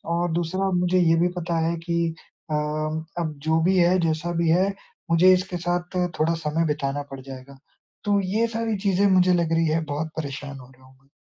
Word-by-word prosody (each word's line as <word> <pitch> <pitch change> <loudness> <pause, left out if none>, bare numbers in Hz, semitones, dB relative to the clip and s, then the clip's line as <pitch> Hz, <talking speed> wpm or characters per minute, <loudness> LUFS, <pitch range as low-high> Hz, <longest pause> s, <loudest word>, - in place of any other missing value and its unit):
और 175 0 0
दूसरा, 175 +3 -1
मुझे 180 +1 +2
ये 165 -2 +4
भी 175 - +3
पता 170 -1 -2
है 170 - 0
कि 170 -1 0 0.4
अ, - - 0
अब 155 +2 -3
जो 160 +1 +2
भी 185 +2 +3
है, 180 +1 +4
जैसा 165 +1 -1
भी 165 - +2
है, 190 +4 +3 0.4
मुझे 180 +3 +6
इसके 185 0 -1
साथ 175 +1 -2 0.2
थोड़ा 160 +2 +2
समय 160 0 -1
बिताना 145 -1 -2
पड़ 135 - -7
जाएगा। 135 +1 -11 0.5
तो 205 -1 +3
ये 205 +5 0
सारी 225 -1 -2
चीज़ें 195 0 +1
मुझे 185 -1 +4
लग 170 -2 +1
रही 165 0 +2
है, 160 +1 +1
बहुत 150 +2 -3
परेशान 140 -2 -5
हो 125 - -13
गया 130 0 -21
हूँ 130 0 -20
मैं। 135 - -31
165 Hz, 205 wpm, -24 LUFS, 155-180 Hz, 0.5 s, मुझे